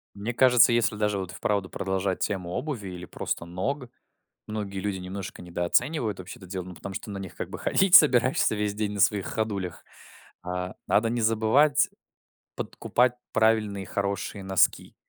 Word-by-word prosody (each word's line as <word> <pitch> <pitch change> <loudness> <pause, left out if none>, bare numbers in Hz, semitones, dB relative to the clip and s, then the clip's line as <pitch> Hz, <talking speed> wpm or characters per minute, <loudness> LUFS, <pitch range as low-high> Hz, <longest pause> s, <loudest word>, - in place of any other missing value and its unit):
Мне 105 +4 -4
кажется, 125 -1 +6
если 115 -2 +2
даже 105 -1 0
вот, 95 -2 -4
и - - -10
вправду, 100 -3 -1
продолжать 95 0 -2
тему 95 -4 -2
обуви 120 - -4
или 90 -1 -7
просто 85 - -4
ног, 125 +10 -3 0.6
многие 105 -3 -4
люди 100 0 -2
немножко 95 +1 -7
недооценивают 105 - 0
вообще 95 - -9
это 95 - -12
дело, 90 0 -5
ну, 90 0 -9
потому 95 +3 -8
что 105 - -6
на 100 - -5
них 95 -2 -8
как - - -5
бы - - -6
ходить 190 -2 +2
собираешься 130 -5 +6
весь 105 -1 -1
день, 105 -1 -2
на 100 - -3
своих 100 0 +3
ходулях 100 -6 -3 0.6
А, 90 +1 -4
надо 115 +2 +3
не 120 0 -1
забывать 115 +7 +3 0.7
подкупать 125 0 0 0.2
правильные 105 -3 +2
хорошие 100 0 -3
носки. 95 -2 +2
100 Hz, 165 wpm, -26 LUFS, 95-115 Hz, 0.7 s, кажется